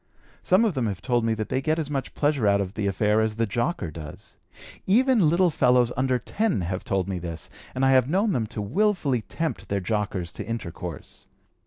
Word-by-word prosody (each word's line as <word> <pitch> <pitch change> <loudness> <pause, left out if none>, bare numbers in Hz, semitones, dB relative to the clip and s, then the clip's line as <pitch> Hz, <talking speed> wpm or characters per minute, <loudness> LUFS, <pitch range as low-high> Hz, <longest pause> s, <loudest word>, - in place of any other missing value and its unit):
Some 190 +5 +4
of 215 - +1
them 130 -5 -1
have 100 -3 -3
told 120 +1 0
me 115 0 +1
that 110 -1 -4
they 130 - 0
get 155 +3 +1
as 150 -3 -3
much 135 -2 -3
pleasure 145 -7 +1
out 100 0 +4
of 95 -1 -3
the 105 -2 -2
affair 105 +2 +2
as 110 -1 0
the 115 +1 +1
jocker 120 - -2
does. 75 -1 -10 0.5
Even 230 - +4
little 175 +2 +3
fellows 125 -4 +3
under 130 0 +1
10 195 - -1
have 90 +2 -3
told 95 -2 -1
me 95 -2 -3
this, 85 -2 -5 0.2
and 130 +1 +1
I 135 - +5
have 130 0 +4
known 200 +6 +2
them 115 -6 -1
to 105 -1 -5
willfully 150 - +1
tempt 165 +8 -4
their 100 - 0
jockers 100 -3 -2
to - - -5
intercourse. 90 -7 -7
120 Hz, 210 wpm, -25 LUFS, 100-155 Hz, 0.5 s, I